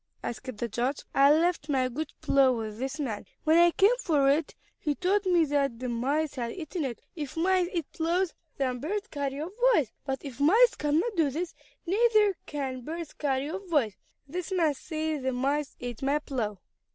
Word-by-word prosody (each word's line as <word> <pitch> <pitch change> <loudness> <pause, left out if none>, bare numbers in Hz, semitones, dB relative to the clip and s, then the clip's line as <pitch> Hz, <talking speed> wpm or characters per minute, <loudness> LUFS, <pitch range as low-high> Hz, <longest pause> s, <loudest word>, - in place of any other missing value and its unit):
asked 255 0 -5
the 235 - -2
judge. 245 +5 -2
"I 275 +1 +6
left 325 -1 +2
my 260 -3 +2
good 285 +5 -4
plow 270 -2 +4
with 220 -2 -5
this 265 +3 -3
man. 230 -8 -3 0.2
When 320 +2 +5
I 345 0 +7
came 400 +7 +4
for 285 - +3
it 300 +2 0 0.2
he 295 -2 -1
told 385 +3 +1
me 345 -3 +4
that 280 -4 0
the 250 +1 -4
mice 280 +6 0
had 235 -3 -3
eaten 330 -2 -4
it. 240 -3 -5
If 300 -2 -6
mice 365 +1 +3
eat 335 -5 -2
plows, 340 +2 0 0.2
then 255 -2 -1
birds 400 - -2
carry 280 -1 -3
off 320 +4 -4 0.2
boys; 260 - +1
but 270 +1 -4
if 270 -2 -8
mice 440 +12 +6
cannot 320 +10 0
do 320 -4 +3
this, 330 +6 -3 0.3
neither 420 +1 +4
can 265 -3 -3
birds 320 +4 -6
carry 280 0 -1
off 385 +1 -6
boys. 270 - +2 0.3
This 355 +5 -5
man 335 -5 +2
says 310 +1 -3
the 260 0 -1
mice 280 +3 -1
ate 245 -2 -6
my 275 +2 +2
plow." 240 -9 -3
295 Hz, 190 wpm, -28 LUFS, 265-340 Hz, 0.3 s, I